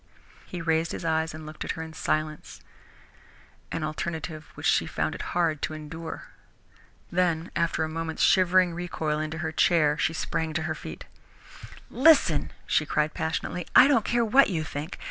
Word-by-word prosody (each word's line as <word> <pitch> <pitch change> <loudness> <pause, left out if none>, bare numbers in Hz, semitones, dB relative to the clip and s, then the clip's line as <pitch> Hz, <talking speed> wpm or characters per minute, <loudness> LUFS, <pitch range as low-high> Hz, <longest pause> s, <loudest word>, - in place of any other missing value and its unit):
He 180 -2 -6
raised 165 0 +1
his - - -5
eyes 160 0 +1
and 155 0 -9
looked 155 0 -7
at - - -2
her 160 - -5
in 160 0 -9
silence, 155 -1 -3 1.1
an 165 - -3
alternative 155 0 -4
which - - -7
she - - +3
found - - -2
it - - -6 0.2
hard 160 -4 +1
to 155 - -2
endure. 160 +2 -7 0.9
Then, 170 -1 0
after 170 -1 +1
a - - -1
moment's 160 0 -3
shivering 185 -2 +4
recoil 160 -3 -2
into 155 +1 -3
her 160 - -2
chair, 155 -3 +3
she 155 +3 +1
sprang 160 0 -2
to 160 0 -1
her 160 -1 -1
feet. - - -9 0.9
"Listen," 310 +3 +4
she - - +2
cried 150 0 0
passionately, 170 +2 -3
"I - - +9
don't 270 -7 +3
care 235 +1 +1
what 260 +4 +5
you 165 -5 -1
think! 155 +2 -6
160 Hz, 170 wpm, -27 LUFS, 155-175 Hz, 1.1 s, I